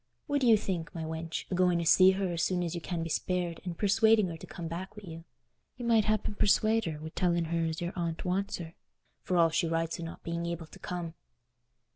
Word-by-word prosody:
What 285 Hz, -1 st, 0 dB
do 250 Hz, -, +3 dB
you 225 Hz, -2 st, +7 dB
think, 180 Hz, -5 st, -4 dB
my 165 Hz, -, -3 dB
wench, 160 Hz, 0 st, -4 dB
o' -, -, +1 dB
going 180 Hz, -1 st, +3 dB
to 170 Hz, -, -1 dB
see 185 Hz, +3 st, +7 dB
her 190 Hz, -1 st, -1 dB
as 165 Hz, -, -1 dB
soon 180 Hz, 0 st, +1 dB
as 170 Hz, -, -3 dB
you 170 Hz, -, -4 dB
can 170 Hz, -1 st, -3 dB
be 165 Hz, -, -4 dB
spared 175 Hz, 0 st, -1 dB
and 175 Hz, -3 st, -5 dB
persuading 220 Hz, -1 st, +4 dB
her 165 Hz, -, -6 dB
to -, -, -11 dB
come 170 Hz, -3 st, -6 dB
back 185 Hz, +5 st, -6 dB
wi' 210 Hz, -, -9 dB
you? 165 Hz, 0 st, -9 dB, 0.5 s
You 245 Hz, -, -5 dB
might 225 Hz, -3 st, +4 dB
happen 215 Hz, -1 st, 0 dB
persuade 215 Hz, +2 st, +3 dB
her 155 Hz, -3 st, -4 dB
wi' 160 Hz, +1 st, -6 dB
telling 170 Hz, -2 st, +1 dB
her 165 Hz, +1 st, -1 dB
as 160 Hz, 0 st, -3 dB
her 175 Hz, +1 st, -3 dB
aunt 170 Hz, -1 st, -3 dB
wants 190 Hz, +2 st, -1 dB
her, 165 Hz, -2 st, -8 dB, 0.5 s
for 180 Hz, -, -1 dB
all 165 Hz, -1 st, +5 dB
she 165 Hz, +1 st, +1 dB
writes 165 Hz, 0 st, -1 dB
o' -, -, -5 dB
not 165 Hz, -, -8 dB
being 170 Hz, 0 st, -3 dB
able 170 Hz, -1 st, -4 dB
to -, -, -15 dB
come." 175 Hz, -2 st, -5 dB
175 Hz, 245 wpm, -30 LUFS, 165-190 Hz, 0.5 s, you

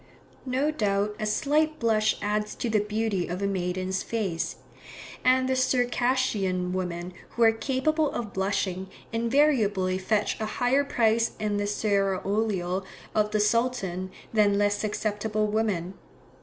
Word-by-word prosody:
No 265 Hz, +4 st, +1 dB
doubt 210 Hz, -5 st, 0 dB
a 215 Hz, -, -1 dB
slight 305 Hz, +8 st, +1 dB
blush 220 Hz, -4 st, +2 dB
adds 210 Hz, +1 st, -1 dB
to 235 Hz, -, -2 dB
the 215 Hz, -, +3 dB
beauty 210 Hz, -2 st, -1 dB
of 175 Hz, +1 st, -4 dB
a 200 Hz, -, -1 dB
maiden's 185 Hz, 0 st, -1 dB
face; 195 Hz, -8 st, -2 dB, 0.7 s
and 255 Hz, 0 st, +4 dB
the 260 Hz, -, +1 dB
Circassian 245 Hz, -8 st, +1 dB
women 180 Hz, -1 st, -3 dB, 0.2 s
who 235 Hz, -, +2 dB
are 225 Hz, -, +7 dB
capable 285 Hz, +6 st, 0 dB
of 220 Hz, -4 st, -4 dB
blushing, 190 Hz, -1 st, -1 dB, 0.2 s
invariably 230 Hz, -7 st, +2 dB
fetch 205 Hz, +2 st, 0 dB
a 215 Hz, -, -2 dB
higher 260 Hz, +3 st, +3 dB
price 230 Hz, -3 st, +2 dB
in 210 Hz, -1 st, -1 dB
the 205 Hz, 0 st, -1 dB
seraolio 195 Hz, -2 st, 0 dB, 0.3 s
of 210 Hz, -1 st, +2 dB
the 210 Hz, 0 st, 0 dB
Sultan 210 Hz, -5 st, 0 dB, 0.2 s
than 205 Hz, -2 st, +4 dB
less 205 Hz, 0 st, +2 dB
susceptible 215 Hz, 0 st, -1 dB
women. 205 Hz, -4 st, -1 dB
210 Hz, 135 wpm, -27 LUFS, 195-235 Hz, 0.7 s, are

